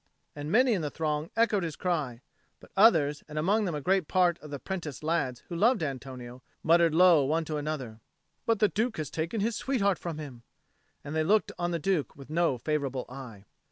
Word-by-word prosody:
And 145 +1 -5
many 250 +3 +4
in 190 - 0
the 150 - -2
throng 155 +1 -2
echoed 225 -3 +3
his 165 -4 -3
cry; 150 -10 -2 0.4
but - - -17
others, 160 -9 +4
and 155 0 -8
among 205 +7 +2
them 175 -5 -2
a 150 - -3
great 185 +1 +1
part 180 -2 +2
of 150 - -11
the 145 - -4
apprenticed 160 -2 -5
lads 150 -6 -1
who 175 - -6
loved 220 +1 +3
Antonio, 130 -3 -6 0.2
muttered 165 0 +4
low 175 -4 +6
one 160 +4 0
to 155 -1 -3
another, 145 -7 -4 0.5
"But 230 -1 +3
the 210 - +4
Duke 220 +3 -1
has 155 -3 -4
taken 165 +7 -2
his 225 +2 0
sweetheart 200 -8 0
from 170 -3 -5
him," 140 -6 -8 0.6
and 145 +2 -6
they 160 - +2
looked 210 +6 +2
on 175 0 0
the 170 - -1
Duke 165 -2 -1
with 140 +1 -12
no 165 -5 +2
favourable 135 -1 -2
eye. 125 -6 -10
160 Hz, 205 wpm, -29 LUFS, 145-185 Hz, 0.6 s, low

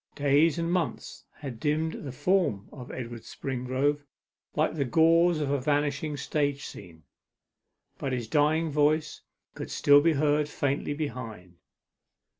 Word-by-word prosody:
Days 145 +3 +3
and 170 0 -1
months 175 -2 -3
had 130 -6 -8
dimmed 155 +3 0
the 140 - -5
form 150 - 0
of 125 -3 -9
Edward 120 -2 -6
Springrove 135 +4 -2 0.5
like 155 +1 +1
the 150 -3 0
gauzes 165 +4 +4
of 140 - -2
a 140 -2 0
vanishing 145 +1 0
stage 145 -1 -1
scene, 80 -3 -11 1.0
but 135 - -2
his 120 -3 -2
dying 155 +4 +2
voice 150 +1 +1 0.3
could - - -7
still 145 0 +5
be 165 +1 +3
heard 150 0 +1
faintly 145 0 -1
behind. 115 - -6
145 Hz, 135 wpm, -28 LUFS, 130-155 Hz, 1.0 s, still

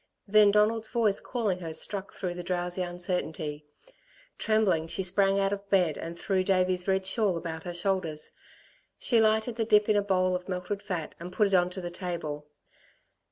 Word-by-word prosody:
Then 210 0 +6
Donald's 215 +2 +2
voice 220 -4 +1
calling 215 -7 -2
her 165 -3 -5
struck 200 +3 0
through 180 -3 -4
the 175 - -6
drowsy 175 +1 -2
uncertainty. 170 -4 -3 0.7
Trembling, 210 -7 +2
she 190 - -1
sprang 195 +2 +2
out 195 0 +1
of 200 0 -6
bed 180 -6 +3
and 170 +1 -6
threw 190 +1 0
Davey's 185 -1 +1
red 190 0 +1
shawl 195 -2 +1
about 160 -1 -5
her 175 - -4
shoulders. 175 -4 -2 0.7
She 230 -3 +3
lighted 220 +2 +2
the 225 - +1
dip 210 -1 +4
in 215 - +4
a 205 - +4
bowl 185 -2 +1
of 180 +1 -6
melted 185 +2 -3
fat 175 -7 -4
and 175 +2 -7
put 210 +3 +2
it 200 - -1
on 180 -1 +4
to 185 +1 -6
the 175 -1 -5
table. 160 -5 -5
185 Hz, 185 wpm, -28 LUFS, 175-205 Hz, 0.7 s, Then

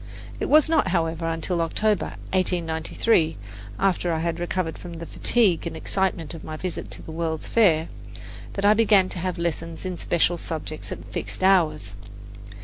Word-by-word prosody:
It - - -2
was 305 0 +7
not, 320 -1 +3
however, 165 -1 0
until 165 +1 -1
October, 210 +4 0 0.2
1893, 170 0 +1 0.4
after 180 -2 +1
I 165 - 0
had 170 0 -1
recovered 175 -1 -2
from 175 -1 -8
the 165 0 -7
fatigue 190 -3 +1
and 165 - -5
excitement 180 -3 -1
of 165 - -9
my 155 0 -6
visit 185 +1 -4
to - - -9
the - - -8
World's 160 -1 -3
Fair, 170 -8 +4 0.7
that 195 - -2
I 205 - +7
began 210 -4 +4
to 180 - -5
have 185 +1 -2
lessons 165 0 -3
in 185 -2 -4
special 170 0 +1
subjects 155 -1 -5
at - - -6
fixed - - -4
hours. 155 - +3
170 Hz, 165 wpm, -24 LUFS, 160-190 Hz, 0.7 s, was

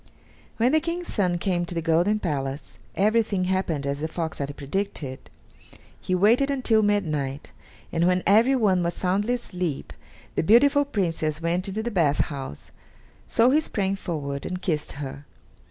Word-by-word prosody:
When 240 +3 +3
the 315 - +4
King's 340 +2 -4
son 180 -4 +1
came 175 -1 0
to 175 0 -5
the 165 - -1
golden 175 +6 +2
palace, 140 -6 -4 0.2
everything 210 -1 +2
happened 180 -6 -1
as 140 0 -2
the 155 - -2
fox 160 0 -4
had 140 0 -4
predicted. 145 -3 -4 0.7
He 185 - -1
waited 230 +9 +4
until 250 -5 +2
midnight, 155 -10 -1 0.4
and 170 +1 +2
when 180 0 +2
everyone 215 -3 +4
was 170 0 -1
soundly 205 +6 0
asleep 180 - -4 0.4
the - - 0
beautiful 280 - +5
Princess 165 - -1
went 170 +3 -1
into 210 +3 -3
the 240 - -3
bath 160 -8 +2 0.2
house, 135 - -8 0.6
so 235 +3 +4
he 305 +3 +4
sprang 195 -9 -1
forward 145 -7 -4
and 180 - -4
kissed 155 -5 -1
her. 140 0 -7
180 Hz, 155 wpm, -25 LUFS, 155-215 Hz, 0.7 s, beautiful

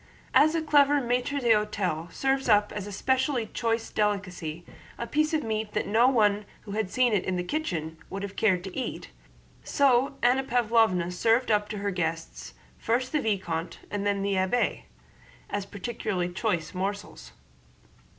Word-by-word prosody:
As 310 +3 +5
a 325 - 0
clever 290 -1 +4
maître 250 +3 -1
d'hôtel 210 - 0
serves 270 -1 0
up 210 -1 +4
as 205 -1 -5
a - - -7
specially 260 +3 0
choice 230 -1 -1
delicacy 185 -6 -2 0.3
a 235 - -3
piece 305 +6 +1
of 315 -2 0
meat 220 -1 -3
that - - 0
no 230 +4 +4
one 210 -5 +3 0.2
who 205 - -10
had 210 -2 -1
seen 250 +1 +2
it 195 - +2
in 185 - -1
the 180 - -1
kitchen 170 - -3
would 195 +1 -5
have 200 -1 -6
cared 185 -5 +2
to 190 -1 -8
eat, 260 - -5 0.5
so 275 0 +2
Anna 250 +2 +4
Pávlovna 225 -8 +2
served 230 +6 +2
up 210 -1 +2
to 210 - -4
her 200 0 -2
guests, 165 -2 -4 0.2
first 250 +3 0
the 305 - +1
vicomte 175 -6 -2
and 205 -1 -2
then 200 -1 0
the 200 0 0
abbé, 190 +6 0 0.7
as 200 -1 -3
peculiarly 200 -4 -3
choice 175 -5 -1
morsels. 185 - -5
210 Hz, 165 wpm, -27 LUFS, 190-245 Hz, 0.7 s, As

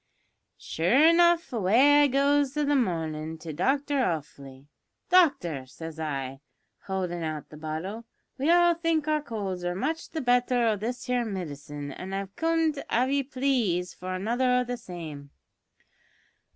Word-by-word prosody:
"Sure 240 - +3
enough 340 -2 +3
away 245 +8 +5
I 290 - +5
goes 280 +1 +2
i' 300 - +2
the 290 0 +2
marnin' 160 - -1
to 160 0 -7
Doctor 275 - 0
Offley. 145 - -4 0.5
`Doctor,' 275 - +3
says 160 +2 -9
I, 135 -4 -4 0.5
howldin' 180 -3 -2
out 155 -2 -4
the 150 - -12
bottle, 160 +9 -5 0.3
`we 290 +5 +2
all 345 0 +5
think 330 -2 0
our 305 -1 +1
colds 200 -9 -4
are 175 0 -2
much 305 - -3
the 320 - -4
better 245 -1 +2
o' 220 -2 +2
this 240 +4 -4
here 250 -1 0
midcine, 145 -8 -6
an' 190 +1 -7
I 195 0 -2
comed, 325 -3 0
av 255 +3 +1
ye 280 0 +2
plaze, 250 -10 0
for 185 +1 -5
another 235 +7 0
o' 250 0 +3
the 245 0 -4
same.' 160 -9 -8
225 Hz, 150 wpm, -27 LUFS, -, 0.5 s, away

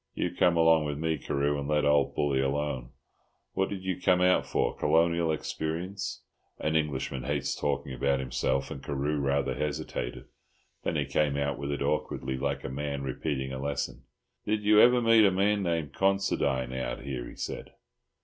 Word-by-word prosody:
You 90 - -1
come 90 -1 +3
along 80 -1 +5
with 75 -1 -3
me, 80 -1 -1
Carew, 70 +2 0
and 70 - -4
let 75 -1 +2
old 75 -1 +3
Bully 70 -2 +1
alone. 70 -2 -1 0.6
What 95 - 0
did 95 -2 -5
you 95 -1 -3
come 90 0 +4
out 90 0 +3
for? - - 0
Colonial 85 0 +2
experience?" 85 +5 -4 0.3
An 80 +1 -1
Englishman 70 -4 -1
hates 75 -1 -1
talking 70 -2 -2
about 70 +2 +1
himself, 65 +1 -1
and 65 - -6
Carew 70 +1 -1
rather 70 0 +1
hesitated. 65 -4 -4 0.6
Then - - -1
he - - +1
came 75 -2 +1
out 70 -2 -1
with 70 0 -3
it 70 0 -2
awkwardly, 70 -2 -1
like 70 +1 -2
a - - -3
man 70 +1 -3
repeating 65 0 -3
a 65 - -4
lesson. 70 +1 -3 0.4
"Did 105 0 -1
you 105 0 +6
ever 125 0 +6
meet 115 -1 +6
a 100 - +6
man 100 +2 +2
named 80 -6 -1
Considine 70 -10 +1
out 65 0 -3
here?" 65 -3 -5
he - - -12
said. - - -6
75 Hz, 180 wpm, -29 LUFS, 70-85 Hz, 0.6 s, you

